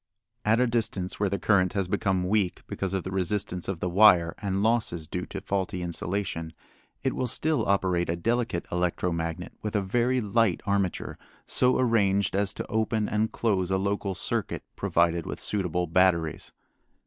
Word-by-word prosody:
At 110 +2 +3
a 125 - +4
distance 110 -6 -1
where 100 -1 +1
the 100 - -1
current 95 -3 +2
has 100 -3 -1
become 95 -1 0
weak 100 -2 0
because 95 0 -3
of 95 - -2
the 95 - -5
resistance 95 -1 -1
of 95 -4 -3
the - - 0
wire 90 -3 +5
and 100 -1 -1
losses 110 -8 +1
due 90 +3 -4
to - - -6
faulty 95 -2 -2
insulation, 85 -1 -3 0.5
it - - +1
will 130 - -1
still 150 0 +1
operate 90 -3 +1
a 85 - +1
delicate 115 -1 -1
electro 90 0 0
magnet 85 -1 -4
with 105 0 -4
a - - +4
very 120 +6 +1
light 110 -3 +2
armature 100 -2 -1 0.3
so 125 0 +2
arranged 100 -6 +2
as 100 0 +1
to - - -4
open 110 -1 0
and 110 +1 0
close 95 -6 0
a 95 - +2
local 100 0 -1
circuit - - -2
provided 85 -1 +1
with - - -5
suitable 90 -4 -1
batteries. 85 -2 +1
95 Hz, 170 wpm, -27 LUFS, 90-105 Hz, 0.5 s, wire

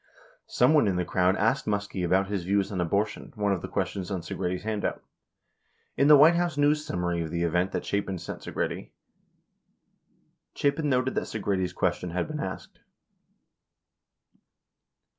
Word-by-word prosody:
60 - - -9
Someone 135 -1 +5
in 95 - +1
the 90 0 0
crowd 90 +1 +2
asked 110 +3 +1
Muskie 100 -2 -2
about 95 +3 +2
his 100 -2 -3
views 100 +2 0
on 95 -3 -2
abortion, 100 +5 -1
one 105 -2 0
of 95 -3 -1
the - - -5
ques - - -1
tions 95 -2 -6
on 95 -3 -3
Segretti's 90 +2 -3
handout. 110 -1 -2 0.9
In 140 - +3
the 150 -1 +9
White 155 +4 +7
House 170 -3 0
news 150 +1 +3
summary 90 - -2
of 80 - -4
the 85 +1 -2
event 90 +3 +1
that - - -3
Chapin 100 -2 -2
sent 85 - -7
Segretti. - - -4 1.7
Chapin 145 +1 0
noted 130 0 +1
that - - -1
Segretti's 100 -4 -1
ques - - 0
tion 90 - -6
had 90 +1 -2
been 155 -1 -5
asked. 95 -8 -6
100 Hz, 165 wpm, -27 LUFS, 90-125 Hz, 1.7 s, the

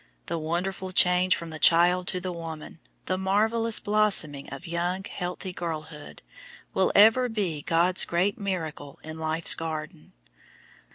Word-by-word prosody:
The 165 - -4
wonderful 185 +4 -3
change 180 -1 +4
from 170 -1 -8
the 155 - -8
child 175 +2 +4
to 185 - +2
the 185 0 -5
woman, 165 -2 -8 0.3
the 185 0 -2
marvelous 220 +4 +2
blossoming 205 -9 +1
of 140 +6 -9
young, 175 +2 -3
healthy 180 0 -6
girlhood, 155 -3 -7 0.5
will 190 - +1
ever 225 +5 +5
be 190 -9 -3
God's 170 +4 +2
great 185 +5 0
miracle 160 -7 -5
in 160 +1 -9
life's 160 +1 +2
garden. 155 - -7
175 Hz, 135 wpm, -26 LUFS, 160-190 Hz, 0.5 s, ever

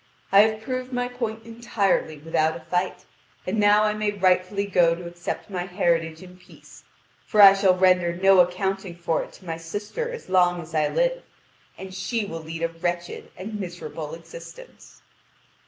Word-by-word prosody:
I 195 - +7
have 215 +1 +4
proved 255 +1 -4
my 245 0 -1
point 230 -3 -5
entirely 225 -8 -1
without 160 +1 0
a - - -13
fight, 180 +2 -2 0.4
and 205 +4 -1
now 205 +1 +5
I 210 0 +2
may 215 0 -1
rightfully 190 0 +1
go 175 -4 +3
to 175 +1 -9
accept 175 0 -6
my 180 -3 -4
heritage 170 -3 0
in 180 0 -14
peace; 180 - -17 0.4
for 215 - 0
I 200 -1 +11
shall 195 -2 +3
render 180 -2 +4
no 190 +2 +4
accounting 185 +1 0
for 170 -1 -1
it - - -9
to 185 - -16
my 165 -1 -4
sister 205 - -5
as 480 - -8
long 180 -1 +3
as 165 -1 -10
I 155 -1 +2
live, - - 0 0.6
and 190 0 -9
she 205 +4 -2
will 165 -4 -6
lead 165 +1 -6
a 165 - +1
wretched 175 +1 -4
and 210 +3 -6
miserable 165 -4 -6
existence." - - -13
185 Hz, 175 wpm, -24 LUFS, 170-210 Hz, 0.6 s, I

